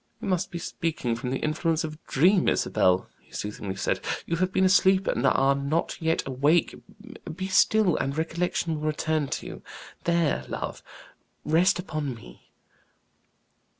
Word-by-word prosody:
"You - - -6
must 185 -1 0
be 170 - -6
speaking 160 -8 -2
from 125 +2 -4
the 130 - -1
influence 160 +1 0
of 155 -1 -4
a 155 - -15
dream, 180 +7 +3
Isabel," 90 0 +2
he - - -28
soothingly 105 -2 -5
said; 95 - -1 0.3
"you 170 - -1
have 185 +2 0
been 190 0 +2
asleep 190 0 +4
and - - 0
are 135 +1 +4
not 140 +6 -2
yet 160 0 +1
awake. 145 +6 +2 0.6
Be 185 +2 -4
still, 190 -1 +3
and 140 +2 -2
recollection 165 0 -1
will 155 - -2
return 155 -1 0
to - - -4
you. - - -9 0.4
There, 170 -3 +1
love; - - -5 0.6
rest 175 +5 +3
upon 155 -7 -4
me." 85 - -15
160 Hz, 155 wpm, -26 LUFS, 140-180 Hz, 0.6 s, asleep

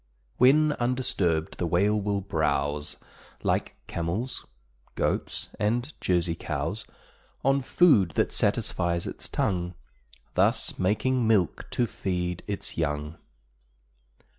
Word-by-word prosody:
When 150 +5 +5
undisturbed, 100 -10 0
the 85 - 0
Whale 100 +5 +2
will 100 0 -1
browse 75 -4 -1 0.5
Like - - 0
camels, 85 +10 -3 0.5
goats, - - -2
and 120 +7 0
Jersey 85 -2 +1
cows, 80 +7 -3 0.6
On 135 +1 +3
food 125 - +4
that - - +1
satisfies 85 0 +1
its - - -2
tongue, 90 -1 -1 0.6
Thus - - +2
making 115 +6 +1
milk 100 -7 +1
to 120 - +1
feed 90 -5 -3
its 100 -4 -2
young. 75 0 -2
95 Hz, 105 wpm, -27 LUFS, 85-120 Hz, 0.6 s, When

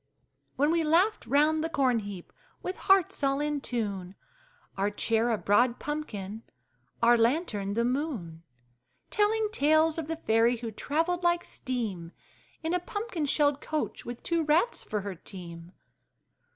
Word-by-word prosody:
When 290 +3 +2
we 335 0 +2
laughed 345 +8 +2
round 305 +2 +3
the 325 - -1
corn 260 -7 +2
heap, 200 -4 -8 0.3
with 370 - -3
hearts 385 -6 +2
all 275 0 +2
in 295 -1 -1
tune, 200 -7 -3 0.6
Our 200 +1 +1
chair 225 +3 +1
a 225 - +1
broad 235 +5 +3
pumpkin, 220 -9 -5 0.6
our 240 +1 +7
lantern 225 - +1
the 235 +1 +2
moon, 245 - -3 0.7
Telling 425 +1 +2
tales 315 0 +3
of 315 - -4
the 325 - -2
fairy 230 -5 +2
who 230 -1 -6
travelled 325 - -1
like 345 0 +2
steam 210 -10 -4 0.5
In 325 +2 -1
a 360 - +2
pumpkin 360 -3 -3
shell 290 0 +3
coach, 305 +1 -3
with 240 0 -8
two 335 -1 +1
rats 325 +10 +2
for 210 -1 -3
her 200 0 -5
team! 170 -1 -10
275 Hz, 150 wpm, -29 LUFS, 215-320 Hz, 0.7 s, our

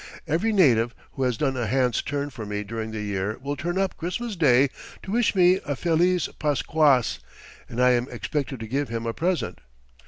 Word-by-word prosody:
Every 170 +8 +1
native 120 - +3 0.2
who 135 - -7
has 125 -3 +1
done 135 0 0
a 120 -3 -1
hand's 125 +1 +1
turn 145 0 -3
for 120 -4 -7
me 105 0 -3
during 110 +1 -5
the 110 -1 -4
year 100 +1 -2
will 140 +2 -4
turn 175 +6 -3
up 195 0 0
Christmas 200 +7 -3
Day 135 -5 +4 0.3
to 190 - -6
wish 230 -1 +2
me 185 0 +5
a 145 - -2
feliz 175 +4 +2
Pasquas, 145 -3 +2 0.5
and 120 - -5
I 125 0 +5
am 120 0 +1
expected 135 +2 -3
to 110 - -5
give 140 +3 -1
him 115 0 -3
a 115 - -1
present. 175 +5 -1
135 Hz, 195 wpm, -25 LUFS, 115-170 Hz, 0.5 s, me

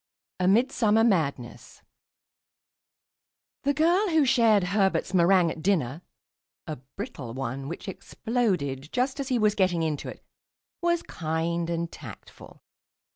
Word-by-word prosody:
A 180 - +1
MIDSUMMER 225 0 +3
MADNESS 150 - -1 1.8
The 285 0 0
girl 350 +6 +3
who 320 -4 +3
shared 225 -5 +4
Herbert's 195 0 0
meringue 175 -1 +4
at 160 - -8
dinner 160 -5 0 0.6
(a 155 -2 -5 0.2
brittle 140 - -6
one, 135 +1 -4
which 170 +6 -7
exploded 185 - -2
just 260 +3 -1
as 275 - -3
he 255 -2 +1
was 210 -2 +3
getting 185 -5 +1
into 155 -3 -2
it) - - -11 0.6
was 345 0 +1
kind 165 +1 -2
and 170 0 -2
tactful. - - -12
190 Hz, 125 wpm, -26 LUFS, 160-235 Hz, 1.8 s, shared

